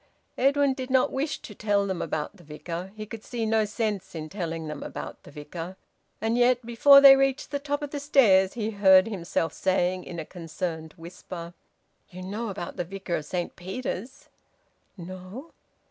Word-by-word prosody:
Edwin 275 Hz, +1 st, +3 dB
did 260 Hz, -1 st, -6 dB
not 260 Hz, -1 st, +3 dB
wish 285 Hz, +3 st, -2 dB
to 210 Hz, -, -9 dB
tell 205 Hz, -1 st, +1 dB
them 190 Hz, -3 st, -2 dB
about 155 Hz, +6 st, -3 dB
the 175 Hz, -, -16 dB
Vicar. 170 Hz, +4 st, -6 dB
He 215 Hz, 0 st, -6 dB
could 220 Hz, +1 st, -9 dB
see 235 Hz, -2 st, -3 dB
no 220 Hz, 0 st, +2 dB
sense 210 Hz, -4 st, -3 dB
in 155 Hz, -1 st, -5 dB
telling 165 Hz, -4 st, -4 dB
them 150 Hz, -1 st, -6 dB
about -, -, -7 dB
the -, -, -14 dB
Vicar. 165 Hz, +5 st, -8 dB, 0.4 s
And 225 Hz, +2 st, 0 dB
yet, 245 Hz, 0 st, +3 dB
before 275 Hz, +4 st, +7 dB
they 275 Hz, -1 st, +11 dB
reached 270 Hz, +1 st, 0 dB
the 285 Hz, -, -1 dB
top 290 Hz, +1 st, -2 dB
of 290 Hz, -, -5 dB
the 290 Hz, -, -3 dB
stairs, 215 Hz, -10 st, +4 dB
he 220 Hz, -2 st, -2 dB
heard 190 Hz, -2 st, +6 dB
himself 175 Hz, -5 st, -2 dB
saying 185 Hz, -1 st, 0 dB
in 170 Hz, -, -7 dB
a 160 Hz, -, -4 dB
concerned 165 Hz, -2 st, -5 dB
whisper 170 Hz, 0 st, -9 dB, 0.6 s
"You 185 Hz, 0 st, -9 dB
know 210 Hz, +5 st, -4 dB
about 190 Hz, -2 st, -6 dB
the 175 Hz, -, -1 dB
Vicar 190 Hz, 0 st, -4 dB
of 150 Hz, -, -6 dB
Saint 175 Hz, +1 st, -3 dB
Peter's?" 240 Hz, +7 st, -6 dB, 0.7 s
"No." 185 Hz, -, -9 dB
195 Hz, 180 wpm, -26 LUFS, 175-245 Hz, 0.7 s, they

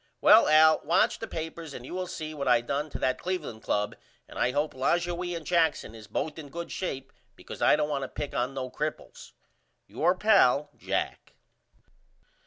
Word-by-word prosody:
Well -, -, +7 dB
Al 155 Hz, +1 st, +6 dB
watch 165 Hz, +4 st, +2 dB
the -, -, -5 dB
papers 160 Hz, -2 st, -6 dB
and 120 Hz, -, -8 dB
you -, -, -8 dB
will 185 Hz, 0 st, -3 dB
see 155 Hz, -2 st, -6 dB
what 140 Hz, -2 st, -4 dB
I 120 Hz, -1 st, +5 dB
done 140 Hz, +5 st, -3 dB
to -, -, -6 dB
that 130 Hz, 0 st, 0 dB
Cleveland 160 Hz, -12 st, -4 dB
Club 105 Hz, 0 st, -1 dB, 0.3 s
and -, -, -9 dB
I -, -, +2 dB
hope 145 Hz, +4 st, -1 dB
Lajoie 175 Hz, +6 st, -1 dB
and 160 Hz, -, -10 dB
Jackson 165 Hz, -9 st, +1 dB
is 110 Hz, -2 st, -12 dB
both 150 Hz, +9 st, -3 dB
in 145 Hz, -2 st, -9 dB
good 170 Hz, +4 st, -7 dB
shape 135 Hz, -8 st, -5 dB, 0.2 s
because -, -, -10 dB
I -, -, +5 dB
don't 150 Hz, 0 st, 0 dB
want 140 Hz, -2 st, -1 dB
to 135 Hz, -, -3 dB
pick 145 Hz, -, -6 dB
on 125 Hz, +3 st, -2 dB
no 130 Hz, -1 st, -4 dB
cripples. 150 Hz, +1 st, -6 dB, 0.5 s
Your 160 Hz, -, +1 dB
pal, 180 Hz, -, +4 dB
JACK. -, -, -4 dB
150 Hz, 190 wpm, -28 LUFS, 130-170 Hz, 0.5 s, Well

